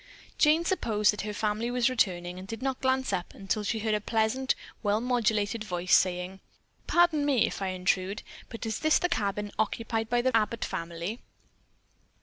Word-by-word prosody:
Jane 315 +2 +4
supposed 215 - +2
that 210 - -4
her 210 - -4
family 215 +2 -1
was 245 -1 +2
returning, 180 -8 0
and 190 - -9
did 225 +4 -6
not 265 -1 -2
glance 260 0 +1
up 180 - -3
until 200 +2 -2
she 225 +2 -1
heard 220 0 -1
a 210 - +1
pleasant, 225 +5 +1 0.3
well 205 0 +1
modulated 225 -3 0
voice 180 -2 +2
saying: 185 +1 +1 0.5
"Pardon 345 -4 +4
me 275 -6 +3
if - - -5
I 195 - -1
intrude, 185 +1 -1 0.3
but 230 - -6
is 220 -1 -2
this 310 0 +4
the 355 - 0
cabin 205 - -1
occupied 225 +1 -1
by 240 0 +2
the 260 -2 +2
Abbott 225 +1 +1
family?" 170 +7 -4
220 Hz, 175 wpm, -28 LUFS, 200-245 Hz, 0.5 s, Jane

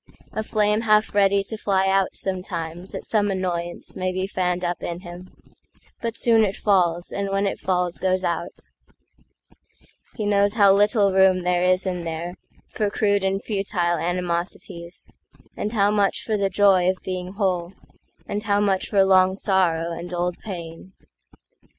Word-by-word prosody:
A 220 - -2
flame 210 0 +1
half 215 -1 +3
ready 200 -1 +3
to 220 - -6
fly 190 -2 +1
out 195 -1 +2
sometimesAt 180 -2 -5
some 205 -2 +1
annoyance 175 -3 -3
may 185 0 -1
be 185 +1 -2
fanned 180 -2 -1
up 175 0 -2
in 175 +1 -5
him, 180 +1 -10 0.7
But 230 -1 -3
soon 225 -2 +4
it 200 -2 -1
falls, 175 -4 +1
and 200 0 -3
when 195 +1 0
it 195 - -2
falls 180 -2 -1
goes 185 0 0
out; 170 0 -3 1.5
He 215 - -3
knows 205 0 +2
how 200 -3 +6
little 205 0 +3
room 190 -1 +4
there 180 0 +1
is 185 +1 +2
in 180 -2 -2
thereFor 175 +5 -5
crude 205 -1 +1
and 195 +1 -1
futile 190 -5 -1
animosities, 175 0 -4 0.5
And 210 - -3
how 205 -2 +2
much 205 -2 +1
for 220 - -1
the 200 -1 +1
joy 190 -2 +4
of 185 - 0
being 185 0 -5
whole, 185 -3 -1 0.5
And 205 - -3
how 205 -1 +1
much 195 -2 0
for 195 -2 +4
long 190 0 +4
sorrow 175 -4 +1
and 170 +1 -6
old 175 0 -2
pain. 175 -2 -8
190 Hz, 155 wpm, -23 LUFS, 175-200 Hz, 1.5 s, how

